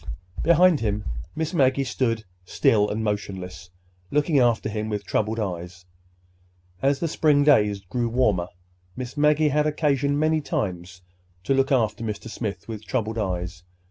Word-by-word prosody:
Behind 170 Hz, -1 st, +5 dB
him, 105 Hz, -2 st, -2 dB, 0.3 s
Miss 160 Hz, +2 st, -2 dB
Maggie 135 Hz, -3 st, +3 dB
still 120 Hz, -1 st, 0 dB, 0.3 s
stood 105 Hz, +3 st, +2 dB
motionless, 95 Hz, -5 st, -4 dB, 0.4 s
looking 150 Hz, 0 st, +2 dB
after 120 Hz, -3 st, +2 dB
him 110 Hz, 0 st, -3 dB
with 105 Hz, -1 st, -3 dB
troubled 110 Hz, +1 st, -1 dB
eyes. 90 Hz, -2 st, -5 dB, 1.0 s
As 140 Hz, 0 st, +2 dB
the 170 Hz, -, 0 dB
spring 150 Hz, -2 st, +3 dB
days 105 Hz, -9 st, +4 dB
grew 115 Hz, +5 st, -2 dB
warmer, 105 Hz, -8 st, +1 dB, 0.5 s
Miss 125 Hz, 0 st, -6 dB
Maggie 150 Hz, +1 st, +3 dB
had 150 Hz, +1 st, +2 dB
occasion 145 Hz, -2 st, +1 dB
many 155 Hz, +1 st, +2 dB
times 90 Hz, -7 st, -4 dB, 0.4 s
to 135 Hz, -, +1 dB
look 135 Hz, +1 st, +2 dB
after 110 Hz, -4 st, +1 dB
Mr. 110 Hz, 0 st, -5 dB
Smith 100 Hz, -6 st, -5 dB
with 110 Hz, -2 st, -6 dB
troubled 110 Hz, -3 st, -2 dB
eyes. 90 Hz, -2 st, -3 dB
115 Hz, 140 wpm, -24 LUFS, 100-145 Hz, 1.0 s, Behind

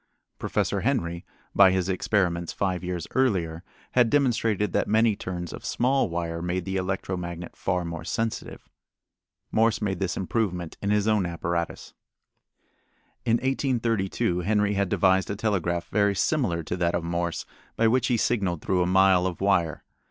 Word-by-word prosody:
Professor -, -, -1 dB
Henry, 85 Hz, 0 st, -1 dB, 0.3 s
by 100 Hz, -1 st, +7 dB
his 95 Hz, -1 st, 0 dB
experiments 90 Hz, -3 st, 0 dB
five 95 Hz, -2 st, -2 dB
years 90 Hz, -2 st, -3 dB
earlier, 90 Hz, -10 st, +1 dB, 0.3 s
had 125 Hz, -2 st, +4 dB
demonstrated 115 Hz, -8 st, +1 dB
that -, -, +1 dB
many 110 Hz, 0 st, +3 dB
turns 90 Hz, -3 st, -5 dB
of -, -, -9 dB
small 130 Hz, -2 st, +1 dB
wire 85 Hz, 0 st, -3 dB
made 90 Hz, 0 st, -2 dB
the 95 Hz, -, -3 dB
electro 95 Hz, 0 st, -2 dB
magnet 85 Hz, -1 st, -6 dB
far 90 Hz, -1 st, -1 dB
more 85 Hz, -1 st, -5 dB
sensitive. 115 Hz, -1 st, -3 dB, 0.8 s
Morse 110 Hz, 0 st, +3 dB
made 95 Hz, -4 st, -2 dB
this 95 Hz, -3 st, -1 dB
improvement 90 Hz, -2 st, -2 dB
in 100 Hz, -, -1 dB
his 105 Hz, 0 st, +2 dB
own 105 Hz, -4 st, +2 dB
apparatus. 85 Hz, 0 st, -3 dB, 1.3 s
In 115 Hz, -, +2 dB
1832 115 Hz, -9 st, 0 dB
Henry 105 Hz, +2 st, +1 dB
had 100 Hz, -2 st, 0 dB
devised 95 Hz, 0 st, +3 dB
a 100 Hz, -, -2 dB
telegraph 95 Hz, -5 st, -1 dB
very 100 Hz, -1 st, +2 dB
similar 105 Hz, -, 0 dB
to 85 Hz, -, -3 dB
that 85 Hz, -1 st, +1 dB
of 85 Hz, -, -1 dB
Morse 85 Hz, 0 st, -2 dB, 0.3 s
by 115 Hz, -, +3 dB
which 125 Hz, +2 st, +2 dB
he 120 Hz, -, +2 dB
signaled 95 Hz, -8 st, 0 dB
through 90 Hz, -1 st, +1 dB
a 90 Hz, -, +2 dB
mile 95 Hz, -1 st, +4 dB
of 90 Hz, -3 st, -5 dB
wire. 90 Hz, -6 st, +1 dB
95 Hz, 160 wpm, -26 LUFS, 85-110 Hz, 1.3 s, by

